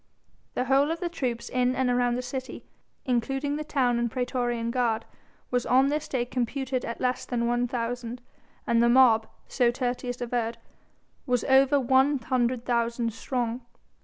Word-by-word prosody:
The -, -, +1 dB
whole 275 Hz, +3 st, +3 dB
of 330 Hz, +1 st, -2 dB
the 350 Hz, -2 st, -2 dB
troops 250 Hz, -8 st, -3 dB
in 250 Hz, 0 st, +1 dB
and 260 Hz, 0 st, +1 dB
around 245 Hz, -1 st, +2 dB
the 250 Hz, -, -3 dB
city, 260 Hz, +1 st, -6 dB, 0.4 s
including 270 Hz, +4 st, 0 dB
the 305 Hz, -, -3 dB
town 255 Hz, -5 st, +1 dB
and 235 Hz, 0 st, 0 dB
praetorian 240 Hz, -1 st, -1 dB
guard, 235 Hz, -3 st, 0 dB, 0.5 s
was 245 Hz, -1 st, +1 dB
on 260 Hz, +3 st, +4 dB
this 305 Hz, +1 st, -2 dB
day 245 Hz, -3 st, -1 dB
computed 255 Hz, +1 st, -2 dB
at 235 Hz, -, -5 dB
less 255 Hz, 0 st, 0 dB
than 235 Hz, -2 st, -2 dB
one 240 Hz, +1 st, +1 dB
thousand, 245 Hz, 0 st, -4 dB, 0.5 s
and 235 Hz, 0 st, +3 dB
the 235 Hz, -, +4 dB
mob 235 Hz, -3 st, +5 dB, 0.2 s
so 245 Hz, -3 st, +2 dB
Tertius 245 Hz, 0 st, -3 dB
averred 235 Hz, -1 st, -2 dB, 0.7 s
was 250 Hz, -1 st, +1 dB
over 270 Hz, +2 st, +4 dB
one 265 Hz, +3 st, +3 dB
hundred 245 Hz, -1 st, -1 dB
thousand 235 Hz, -1 st, 0 dB
strong. 240 Hz, +1 st, -3 dB
245 Hz, 160 wpm, -27 LUFS, 235-265 Hz, 0.7 s, mob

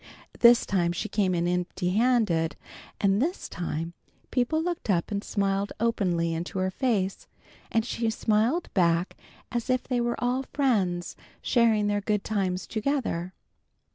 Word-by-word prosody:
This 235 Hz, 0 st, +7 dB
time 175 Hz, -3 st, +1 dB
she 195 Hz, -, -3 dB
came 195 Hz, -3 st, +1 dB
in 170 Hz, 0 st, 0 dB
empty 180 Hz, 0 st, -1 dB
handed, 210 Hz, -7 st, +2 dB, 0.4 s
and 200 Hz, +1 st, +2 dB
this 340 Hz, +7 st, -1 dB
time 165 Hz, -1 st, -4 dB, 0.4 s
people 255 Hz, +5 st, +1 dB
looked 340 Hz, -6 st, -3 dB
up 175 Hz, +1 st, +1 dB
and 200 Hz, 0 st, -2 dB
smiled 200 Hz, 0 st, -1 dB
openly 180 Hz, -8 st, +1 dB
into 170 Hz, +3 st, -4 dB
her 185 Hz, 0 st, 0 dB
face, 200 Hz, -4 st, -1 dB, 0.4 s
and 225 Hz, -1 st, +1 dB
she 230 Hz, -2 st, -1 dB
smiled 225 Hz, +9 st, +1 dB
back 170 Hz, -1 st, +2 dB, 0.4 s
as 240 Hz, -1 st, -3 dB
if 255 Hz, 0 st, +2 dB
they 250 Hz, -2 st, -1 dB
were 240 Hz, 0 st, 0 dB
all 245 Hz, +2 st, 0 dB
friends, 205 Hz, -11 st, 0 dB, 0.3 s
sharing 225 Hz, -3 st, +3 dB
their 205 Hz, 0 st, 0 dB
good 210 Hz, 0 st, 0 dB
times 185 Hz, -5 st, -1 dB
together. 220 Hz, -, -2 dB
205 Hz, 145 wpm, -27 LUFS, 180-240 Hz, 0.4 s, This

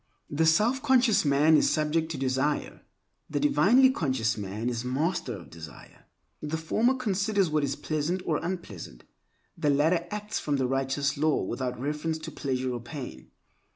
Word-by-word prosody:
The 160 Hz, +2 st, +2 dB
self 215 Hz, +11 st, +3 dB
conscious 255 Hz, -5 st, +4 dB
man 145 Hz, +3 st, +4 dB
is -, -, +4 dB
subject 155 Hz, +1 st, 0 dB
to 160 Hz, -, -4 dB
desire; 135 Hz, +2 st, -1 dB, 0.5 s
the -, -, -1 dB
divinely 260 Hz, -2 st, +5 dB
conscious 130 Hz, -, 0 dB
man 105 Hz, +3 st, -4 dB
is 120 Hz, -1 st, -2 dB
master 130 Hz, -1 st, -1 dB
of 85 Hz, -, -14 dB
desire. 80 Hz, -1 st, -12 dB, 0.4 s
The 150 Hz, +2 st, -3 dB
former 220 Hz, +11 st, +1 dB
considers 200 Hz, -6 st, 0 dB
what 150 Hz, -1 st, +1 dB
is 140 Hz, -1 st, -1 dB
pleasant 160 Hz, +4 st, -2 dB
or 155 Hz, -, +1 dB
unpleasant; 110 Hz, -, -6 dB, 0.5 s
the 150 Hz, -, 0 dB
latter 160 Hz, +5 st, +2 dB
acts 210 Hz, +1 st, -4 dB
from 145 Hz, -, -1 dB
the 135 Hz, -2 st, 0 dB
righteous 135 Hz, +2 st, -1 dB
law 155 Hz, +1 st, +1 dB
without 125 Hz, +4 st, -3 dB
reference 150 Hz, +4 st, -2 dB
to 160 Hz, +1 st, -8 dB
pleasure 130 Hz, -3 st, -2 dB
or 120 Hz, -, -5 dB
pain. 125 Hz, +2 st, -8 dB
150 Hz, 160 wpm, -27 LUFS, 130-180 Hz, 0.5 s, divinely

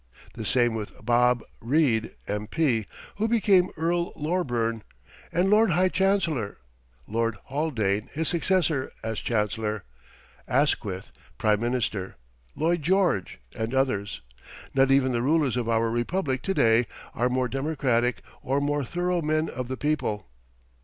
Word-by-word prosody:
The 110 Hz, -, -6 dB
same 120 Hz, +1 st, +2 dB
with 110 Hz, -2 st, -7 dB
"Bob" 120 Hz, 0 st, +3 dB, 0.2 s
Reid, 120 Hz, -3 st, +1 dB
M.P., 110 Hz, +3 st, 0 dB, 0.3 s
who 215 Hz, +2 st, +1 dB
became 200 Hz, -5 st, +4 dB
Earl 170 Hz, +2 st, 0 dB
Loreburn 120 Hz, -9 st, -1 dB, 0.5 s
and 180 Hz, +3 st, +2 dB
Lord 215 Hz, +3 st, +5 dB
High 180 Hz, +2 st, +3 dB
Chancellor, 170 Hz, -, +1 dB, 0.5 s
Lord 115 Hz, +2 st, -1 dB
Haldane, 115 Hz, -8 st, -1 dB
his 160 Hz, +1 st, -2 dB
successor 170 Hz, -5 st, +1 dB
as 110 Hz, -1 st, -2 dB
Chancellor; 105 Hz, -2 st, -1 dB, 0.6 s
Asquith, 105 Hz, -, 0 dB, 0.3 s
Prime 105 Hz, -1 st, +2 dB
Minister, 115 Hz, -5 st, -2 dB, 0.4 s
Lloyd 170 Hz, +2 st, +1 dB
George, 175 Hz, -, +1 dB, 0.2 s
and 110 Hz, +3 st, -2 dB
others. 100 Hz, -, 0 dB, 0.5 s
Not 135 Hz, 0 st, +4 dB
even 135 Hz, -1 st, +4 dB
the 120 Hz, -1 st, 0 dB
rulers 145 Hz, -1 st, +2 dB
of 120 Hz, -2 st, -1 dB
our 115 Hz, 0 st, +2 dB
Republic 130 Hz, +2 st, -1 dB
to 195 Hz, -, -2 dB
day 115 Hz, +1 st, +4 dB, 0.3 s
are 120 Hz, +2 st, +1 dB
more 130 Hz, 0 st, +1 dB
democratic 130 Hz, -3 st, 0 dB, 0.2 s
or 135 Hz, +2 st, 0 dB
more 145 Hz, 0 st, 0 dB
thorough 175 Hz, +5 st, -1 dB
men 155 Hz, +1 st, 0 dB
of 125 Hz, 0 st, -5 dB
the 130 Hz, +1 st, -4 dB
people. 130 Hz, -10 st, -1 dB
130 Hz, 130 wpm, -26 LUFS, 115-160 Hz, 0.6 s, Lord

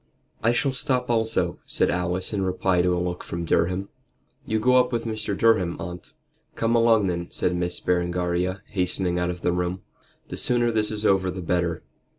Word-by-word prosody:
"I 115 Hz, -, +3 dB
shall 135 Hz, +3 st, +1 dB
stop 130 Hz, -2 st, 0 dB
also," 110 Hz, -6 st, 0 dB
said -, -, +2 dB
Alice 90 Hz, +2 st, 0 dB
in 100 Hz, -, -1 dB
reply 95 Hz, -1 st, +1 dB
to 90 Hz, 0 st, +1 dB
a -, -, -2 dB
look 90 Hz, 0 st, -3 dB
from 85 Hz, 0 st, -5 dB
Durham. 90 Hz, +4 st, 0 dB, 0.6 s
"You 110 Hz, 0 st, 0 dB
go 125 Hz, +3 st, +4 dB
up 125 Hz, 0 st, +3 dB
with 120 Hz, -1 st, -2 dB
Mr. 110 Hz, -3 st, -3 dB
Durham, 100 Hz, -7 st, +2 dB
aunt." 85 Hz, +1 st, -8 dB, 0.4 s
"Come 115 Hz, +1 st, +1 dB
along 115 Hz, -3 st, +4 dB
then," 85 Hz, -2 st, -2 dB
said 90 Hz, -, -1 dB
Miss 90 Hz, 0 st, -1 dB
Berengaria, 90 Hz, +1 st, -1 dB
hastening 90 Hz, -2 st, 0 dB
out 90 Hz, 0 st, 0 dB
of 90 Hz, 0 st, -5 dB
the 90 Hz, -, +1 dB
room; 90 Hz, +1 st, -2 dB, 0.5 s
"the -, -, -6 dB
sooner 120 Hz, -1 st, +2 dB
this 110 Hz, -1 st, +5 dB
is 110 Hz, 0 st, -2 dB
over 95 Hz, -2 st, +3 dB
the 90 Hz, 0 st, -5 dB
better. 85 Hz, 0 st, -1 dB
95 Hz, 185 wpm, -24 LUFS, 90-110 Hz, 0.6 s, this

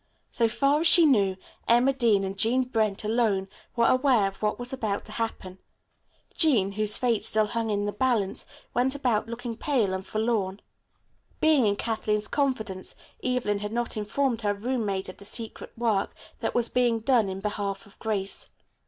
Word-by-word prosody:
So 230 Hz, -, +2 dB
far 275 Hz, +6 st, +2 dB
as 335 Hz, -, +4 dB
she 340 Hz, -1 st, +8 dB
knew, 200 Hz, -10 st, +3 dB, 0.3 s
Emma 245 Hz, +4 st, +4 dB
Dean 230 Hz, -6 st, +2 dB
and 195 Hz, 0 st, -3 dB
Jean 235 Hz, +6 st, +2 dB
Brent, 220 Hz, -5 st, 0 dB
alone, 215 Hz, -3 st, +1 dB, 0.3 s
were 235 Hz, -1 st, +3 dB
aware 255 Hz, -5 st, +4 dB
of 195 Hz, -, -7 dB
what 210 Hz, 0 st, 0 dB
was 245 Hz, +1 st, -4 dB
about 215 Hz, -6 st, -2 dB
to -, -, -9 dB
happen. 190 Hz, -5 st, -4 dB, 0.8 s
Jean, 235 Hz, -, +4 dB
whose 210 Hz, +1 st, +2 dB
fate 235 Hz, -4 st, +1 dB
still 215 Hz, 0 st, +3 dB
hung 225 Hz, +1 st, -2 dB
in 205 Hz, -1 st, 0 dB
the 205 Hz, -, -1 dB
balance, 215 Hz, -3 st, 0 dB, 0.3 s
went 260 Hz, +3 st, +2 dB
about 245 Hz, -6 st, 0 dB
looking 235 Hz, 0 st, -5 dB
pale 230 Hz, -7 st, 0 dB
and 190 Hz, 0 st, -3 dB
forlorn. 215 Hz, -3 st, -1 dB, 0.8 s
Being 305 Hz, -7 st, +4 dB
in 200 Hz, -, +2 dB
Kathleen's 215 Hz, -1 st, -1 dB
confidence, 220 Hz, -10 st, -2 dB, 0.3 s
Evelyn 245 Hz, -5 st, 0 dB
had 210 Hz, 0 st, -5 dB
not 240 Hz, 0 st, -2 dB
informed 230 Hz, +3 st, -1 dB
her 205 Hz, -1 st, 0 dB
roommate 210 Hz, -4 st, -2 dB
of 185 Hz, -, -9 dB
the -, -, -13 dB
secret 220 Hz, +2 st, -5 dB
work 220 Hz, -4 st, 0 dB, 0.2 s
that -, -, -3 dB
was 240 Hz, -1 st, +3 dB
being 240 Hz, -2 st, +1 dB
done 230 Hz, -4 st, +3 dB
in 190 Hz, 0 st, -5 dB
behalf 200 Hz, -1 st, -3 dB
of 200 Hz, -, -19 dB
Grace. 200 Hz, -3 st, -3 dB
220 Hz, 175 wpm, -26 LUFS, 205-245 Hz, 0.8 s, she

